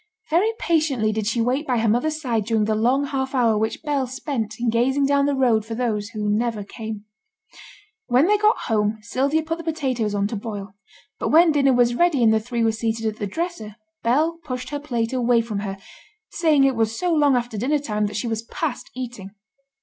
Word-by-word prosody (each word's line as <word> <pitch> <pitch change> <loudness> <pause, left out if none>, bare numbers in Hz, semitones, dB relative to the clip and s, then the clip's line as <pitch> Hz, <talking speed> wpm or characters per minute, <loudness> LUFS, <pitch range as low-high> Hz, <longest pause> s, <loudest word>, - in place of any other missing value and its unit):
Very 375 +8 +3
patiently 300 - +1
did 215 -1 -2
she 230 +1 +1
wait 255 +6 0
by 250 -2 +1
her 225 0 +1
mother's 300 +8 +1
side 235 -8 -1
during 220 -1 +1
the 215 - +1
long 250 +6 +2
half 270 -1 -3
hour 235 -4 +3
which 220 +6 -2
Bell 285 -4 0
spent 250 -4 -4
in 235 -1 +1
gazing 265 +4 +2
down 280 0 +2
the 285 - +1
road 240 -5 +2
for 225 +1 -6
those 220 -4 -1
who 215 -2 -4
never 215 0 0
came. 215 0 -7 1.0
When 250 +4 +4
they 415 +2 +3
got 425 +2 +4
home 215 -1 +1
Sylvia 275 +7 0
put 330 +1 -3
the - - -6
potatoes 260 -10 -1
on 200 0 +1
to 225 - -4
boil; 205 -2 -6 0.5
but - - -1
when 330 +1 +6
dinner 275 -3 +3
was 240 -1 +3
ready 295 -2 +2
and 220 -1 +5
the 220 - +3
three 235 +1 -2
were 225 - +3
seated 225 0 -2
at 215 -1 -2
the 205 - -3
dresser, 320 - -4 0.3
Bell 310 +8 +1
pushed 255 -2 -5
her 290 - -2
plate 240 -5 -2
away 245 -2 +3
from 225 -3 -3
her, 195 -1 -4 0.5
saying 310 -4 +3
it 270 -1 +3
was 225 0 0
so 355 -1 0
long 290 -4 +4
after 240 -2 -2
dinner 260 +8 +1
time 210 -7 -1
that 205 - -5
she 215 - -2
was 225 -1 -2
past 260 +3 -4
eating. 235 -6 -7
240 Hz, 215 wpm, -22 LUFS, 220-285 Hz, 1.0 s, when